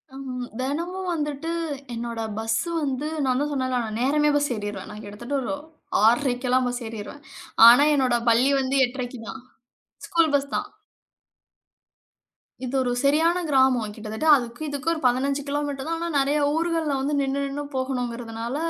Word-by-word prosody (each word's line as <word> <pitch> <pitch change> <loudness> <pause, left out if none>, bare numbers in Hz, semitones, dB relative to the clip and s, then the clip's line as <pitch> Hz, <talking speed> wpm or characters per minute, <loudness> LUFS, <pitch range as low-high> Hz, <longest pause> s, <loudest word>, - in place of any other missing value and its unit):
ஆமா, 270 -1 -6 0.3
தினமும் 340 +8 -3
வந்துட்டு 295 0 -3 0.4
என்னோட 230 0 -4 0.2
பஸ் 225 0 0 0.2
வந்து 280 +1 -2 0.2
நான் 255 0 +1
தான் 295 - -1
சொன்னேன்ல 255 -2 0
நான் 215 0 -4
நேரமே 295 +3 +3
பஸ் 290 -1 +1
ஏறிருவேன். 205 -2 -5
நான் 210 +1 -9
கிட்டத்தட்ட 235 +7 -6
ஒரு 275 +4 -2 0.5
6:30க்குலாம் 250 +1 +2
பஸ் 245 0 -3
ஏறிருவேன். 225 +6 -8 0.5
ஆனா 250 +5 +8
என்னோட 255 -3 +2
பள்ளி 245 +4 +4
வந்து 265 +1 0
8:30க்கு 245 -1 -6
தான். 265 - -7 0.7
ஸ்கூல் 330 -5 +3
பஸ் 280 0 -1
தான். 415 - -1 2.0
இது 255 +2 -4
ஒரு 245 -1 0
சரியான 320 +5 +3
கிராமம். 260 -6 +3
கிட்டத்தட்ட 220 +6 -4
அதுக்கும் 245 +4 -4
இதுக்கும் 285 +3 -2
ஒரு 320 - -5
15 275 +3 +2
கிலோமீட்டர் 285 0 -3
தான். 330 0 -1
ஆனா 340 - -2
நிறையா 285 +2 +2
ஊர்கள்ல 330 -2 0
வந்து 290 +2 -1
நின்னு 275 0 0
நின்னு 280 +1 -3
போகணுங்கிறதுனால, 245 -2 -3
265 Hz, 150 wpm, -24 LUFS, 245-290 Hz, 2.0 s, ஆனா